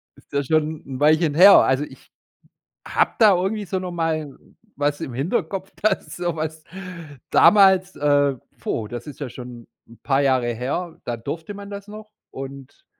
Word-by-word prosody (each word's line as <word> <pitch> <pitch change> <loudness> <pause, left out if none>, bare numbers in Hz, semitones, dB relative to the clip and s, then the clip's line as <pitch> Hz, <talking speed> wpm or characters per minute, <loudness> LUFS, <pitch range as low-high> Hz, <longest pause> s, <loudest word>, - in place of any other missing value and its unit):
Ist - - -23
ja 140 0 +1
schon 155 +2 0
'n 130 -1 -7
Weilchen 155 +1 +3
her. 195 +4 +9
Also, 130 +2 +3
ich - - -17 0.8
habe - - +2
da 210 -4 +7
irgendwie 200 +4 -1
so 190 0 -2
noch 185 -1 -5
mal 160 -4 -2 0.4
was 145 +1 -1
im 130 - -5
Hinterkopf, 190 - -2
dass 215 - 0
so 175 -2 -2
was 155 0 -5 0.7
damals, 190 -2 +5
äh 145 -1 +2 0.2
puh, 110 - -3
das 120 +3 -7
ist 150 - -10
ja 140 - -4
schon 120 -1 -10 0.2
'n 115 - -17
paar 135 -1 +2
Jahre 130 -4 +1
her 145 +9 -4
da 120 -1 -3
durfte 160 - -6
man 200 0 -9
das 200 0 -8
noch 215 +1 -11 0.2
und 135 0 -10
155 Hz, 170 wpm, -22 LUFS, 135-185 Hz, 0.8 s, her